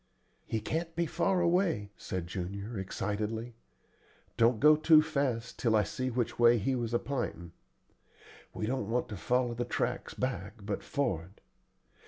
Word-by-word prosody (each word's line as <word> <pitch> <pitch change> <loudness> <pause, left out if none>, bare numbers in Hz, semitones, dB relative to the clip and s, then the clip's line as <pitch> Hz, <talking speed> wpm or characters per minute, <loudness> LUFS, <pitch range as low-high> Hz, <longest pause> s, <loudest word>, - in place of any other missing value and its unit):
"He 110 - -1
can't 165 +8 -3
be 170 +1 +1
far 175 +3 +1
away," 170 - +1
said 90 -2 -4
Junior, 100 +5 -5
excitedly. 105 +5 -3 0.8
"Don't 115 -1 +4
go 150 +1 +7
too 155 0 +6
fast 140 -7 -2
till 115 -3 +2
I 105 - +4
see 130 +4 -3
which 120 -1 -2
way 120 0 +6
he 125 +6 0
was 120 -2 -1
a - - +6
p'intin'. 105 -11 -4 1.0
We 110 - -3
don't 115 -3 -2
want 120 +2 0
to 105 - -5
follow 125 +5 +1
the 120 +1 -2
tracks - - -2
back, 110 -8 -3
but 100 -1 -2
for'ard. 95 - -2
120 Hz, 155 wpm, -31 LUFS, 105-140 Hz, 1.0 s, go